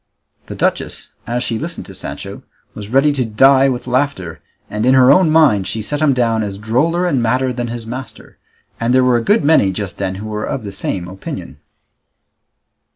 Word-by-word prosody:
The - - -7
duchess, - - -2
as 120 +2 -2
she 115 -3 -3
listened 170 +2 -6
to - - -11
Sancho, - - -7 0.3
was 105 -1 -8
ready 135 +4 +3
to 135 -3 0
die 135 +5 +4
with 125 -1 -3
laughter, 125 - -2 0.3
and 105 +1 -3
in 130 +2 +4
her 130 0 +6
own 165 +3 +5
mind 145 -12 +4
she 110 -1 -4
set 145 +7 -3
him 155 -2 +4
down 115 -3 +1
as 100 -2 -4
droller 140 - 0
and 140 -8 +1
madder 125 +2 0
than 120 -1 -3
his 120 -1 -6
master; 120 -1 -9 0.4
and 120 +2 +1
there 130 - +4
were 125 -1 +3
a - - -1
good 205 - +2
many 145 -10 +4
just 95 0 -6
then 95 -1 -2
who 100 +3 -7
were 105 0 -4
of - - -4
the 100 - -6
same 95 -2 -4
opinion. 95 +2 -8
120 Hz, 200 wpm, -17 LUFS, 105-135 Hz, 0.4 s, her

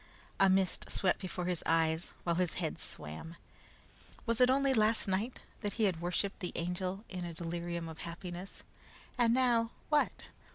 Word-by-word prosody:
A 195 - +6
mist 190 -1 +2
swept 185 -2 +2
before 180 -1 -3
his 180 -2 -1
eyes, 160 +1 +2
while 170 -1 +1
his 180 -2 +1
head - - -2
swam. 80 - -5 0.9
Was 230 +1 +1
it 250 - +7
only 275 +1 +4
last 220 -2 +3
night 200 +6 -1 0.2
that 205 -2 -2
he 225 - 0
had 180 -5 +2
worshiped 180 +3 -1
the 180 - -4
Angel 180 +4 -2
in 180 -1 -5
a 170 -1 -5
delirium 170 0 -3
of 160 0 -8
happiness? 175 +2 -6 0.5
And 240 -3 +4
now, 240 -2 +4 0.2
what? 300 -1 +2
185 Hz, 165 wpm, -33 LUFS, 170-220 Hz, 0.9 s, it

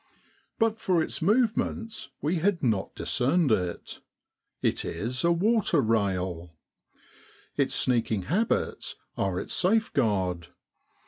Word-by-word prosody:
But 225 -1 +1
for 180 -6 +2
its - - -5
move 220 +6 +3
ments 225 -1 -3
we 160 +5 +1
had 180 +1 0
not 110 -6 0
discerned 140 +3 +1
it. 90 -5 -2 0.6
It - - +1
is 125 +3 -2
q, 170 - +3
water 195 -1 +2
rail. 95 -7 -1 1.0
Its - - +1
sneaking 115 -5 +1
habits 205 - -1 0.2
are 95 -2 -1
its - - -4
safe 220 +5 +2
guard. 95 -6 0
140 Hz, 120 wpm, -27 LUFS, -, 1.0 s, move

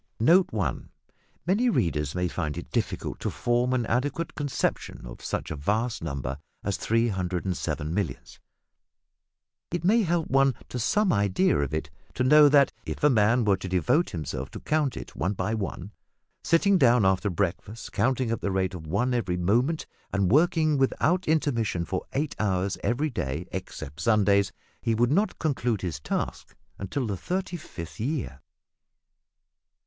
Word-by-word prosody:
Note 170 +11 +5
1. 105 -4 -2 0.6
Many 210 +8 +2
readers 75 - 0
may 90 0 0
find 75 -4 -3
it - - -7
difficult - - -2
to - - -2
form 120 +1 0
an 125 -2 +1
adequate 145 +8 -1
conception 145 - -2
of - - -10
such - - -3
a - - -2
vast 105 - -1
number 70 -3 -4 0.2
as - - -1
307 95 -7 -1
millions. 90 -8 -4 1.3
It 175 -1 -3
may 220 +6 +4
help 170 -4 0
one 135 -1 +3
to 125 - -4
some 210 - +2
idea 100 - +2
of 70 -2 -1
it 75 -1 -3 0.2
to 125 - +1
know 150 +3 +7
that, 140 -1 +5
if - - -6
a 150 - +6
man 115 +1 +3
were 100 -2 +3
to 95 - -6
devote 125 - +2
himself 70 -5 -4
to - - -8
count 150 -4 0
it, - - -8
one 95 +3 -1
by 110 +3 -2
one, 100 -2 -4 0.5
sitting 190 +3 +3
down 120 -6 +5
after 95 +2 +2
breakfast 100 +4 -3
counting 130 -2 +1
at 115 - -2
the - - -1
rate 95 0 0
of 80 -4 -8
one 115 +10 0
every 95 -7 0
moment, 120 - +1 0.3
and 100 -2 +1
working 155 0 +3
without 175 +7 +1
intermission 115 - +1
for 95 - -4
eight 145 +1 -1
hours 95 -2 0
every 140 +6 0
day, 75 - -3
excepting 70 +4 -6
Sundays, 100 -4 +3 0.3
he 115 -2 +1
would 120 +3 +2
not 200 +8 +1
conclude 125 - -1
his 85 -6 -3
task - - -4 0.2
until 120 +7 -2
the 105 -3 -2
thirty 180 - -3
fifth 85 - -8
year. 120 - -3
115 Hz, 160 wpm, -27 LUFS, 90-145 Hz, 1.3 s, know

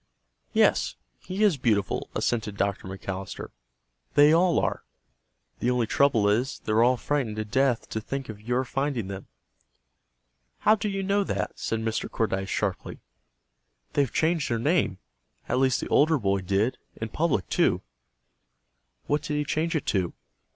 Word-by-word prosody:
"Yes, 60 +3 +3 0.2
he 190 +3 -2
is 200 -8 +4
beautiful," 105 -6 0
assented 110 -4 -1
Dr. 100 -1 -1
McAllister. 95 0 -6 0.7
"They 145 +2 +7
all 175 +1 +4
are. - - 0 0.8
The 120 - +1
only 125 -2 +2
trouble 115 -3 +3
is, 120 +7 +1
they're 110 +1 +3
all 125 +2 +4
frightened 130 -4 -1
to 110 0 -3
death 130 +2 +1
to 110 - -3
think 135 +3 -4
of 105 -2 -8
your 125 +4 0
finding 135 -6 -2
them." 95 0 -7 1.3
"How 215 - +6
do 210 -1 -1
you 195 -1 -2
know 200 +1 +2
that?" - - -2
said 115 0 -2
Mr. 110 0 -2
Cordyce, 95 -3 -1
sharply. 100 -3 -2 1.0
"They've 140 -4 +1
changed 160 -2 +1
their 115 - +1
name. 130 - +1 0.5
At 125 - +1
least 130 -1 +3
the - - -4
older 155 +2 +4
boy 100 -5 +1
did. 100 +6 0 0.2
In 110 - -5
public, 140 - 0
too." - - +2 1.2
"What 145 - +1
did 150 0 -3
he 150 0 0
change 160 +3 -1
it 155 - -1
to?" 95 -4 0
120 Hz, 155 wpm, -26 LUFS, 105-150 Hz, 1.3 s, They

